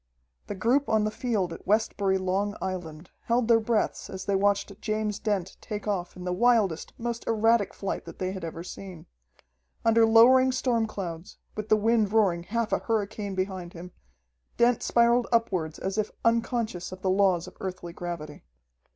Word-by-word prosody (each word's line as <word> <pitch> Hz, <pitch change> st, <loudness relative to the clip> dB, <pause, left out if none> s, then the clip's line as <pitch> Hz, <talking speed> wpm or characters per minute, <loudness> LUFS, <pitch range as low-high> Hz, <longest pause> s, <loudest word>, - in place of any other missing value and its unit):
The 205 Hz, -, -4 dB
group 245 Hz, +9 st, +1 dB
on 220 Hz, -1 st, +3 dB
the 215 Hz, -, 0 dB
field 210 Hz, -7 st, -1 dB
at -, -, -12 dB
Westbury, 200 Hz, -2 st, +2 dB
Long 195 Hz, +2 st, -1 dB
Island, 175 Hz, -3 st, -6 dB
held 235 Hz, 0 st, +1 dB
their 230 Hz, -1 st, +5 dB
breaths 220 Hz, 0 st, -1 dB
as 190 Hz, 0 st, -7 dB
they 200 Hz, -, 0 dB
watched 200 Hz, +1 st, 0 dB
James 215 Hz, -1 st, -2 dB
Dent 195 Hz, -4 st, -2 dB
take 210 Hz, 0 st, -6 dB
off 180 Hz, -4 st, -2 dB
in 180 Hz, -, -8 dB
the 180 Hz, 0 st, -2 dB
wildest, 210 Hz, -5 st, +2 dB
most 235 Hz, 0 st, -4 dB
erratic 225 Hz, -1 st, +3 dB
flight 195 Hz, -, -4 dB
that -, -, -10 dB
they 185 Hz, 0 st, -2 dB
had 190 Hz, -2 st, -7 dB
ever 165 Hz, 0 st, -5 dB
seen. 185 Hz, -2 st, -9 dB, 0.8 s
Under 225 Hz, 0 st, +5 dB
lowering 255 Hz, +4 st, +6 dB
storm 245 Hz, -3 st, 0 dB
clouds, 180 Hz, -3 st, -7 dB, 0.2 s
with 215 Hz, 0 st, -5 dB
the 215 Hz, -, +5 dB
wind 220 Hz, -1 st, +2 dB
roaring 200 Hz, -6 st, +3 dB
half 230 Hz, +5 st, -2 dB
a -, -, +2 dB
hurricane 210 Hz, -3 st, -2 dB
behind 185 Hz, -2 st, -3 dB
him, 180 Hz, +1 st, -9 dB, 0.7 s
Dent 240 Hz, 0 st, +3 dB
spiraled 235 Hz, +1 st, +3 dB
upward 185 Hz, -9 st, 0 dB
as 195 Hz, +3 st, -3 dB
if 210 Hz, -, 0 dB, 0.2 s
unconscious 230 Hz, -5 st, 0 dB
of 185 Hz, 0 st, -10 dB
the 190 Hz, -, +2 dB
laws 185 Hz, -3 st, +3 dB
of -, -, -12 dB
Earthly 185 Hz, -2 st, -6 dB
gravity. 170 Hz, -4 st, -6 dB
205 Hz, 175 wpm, -27 LUFS, 185-225 Hz, 0.8 s, lowering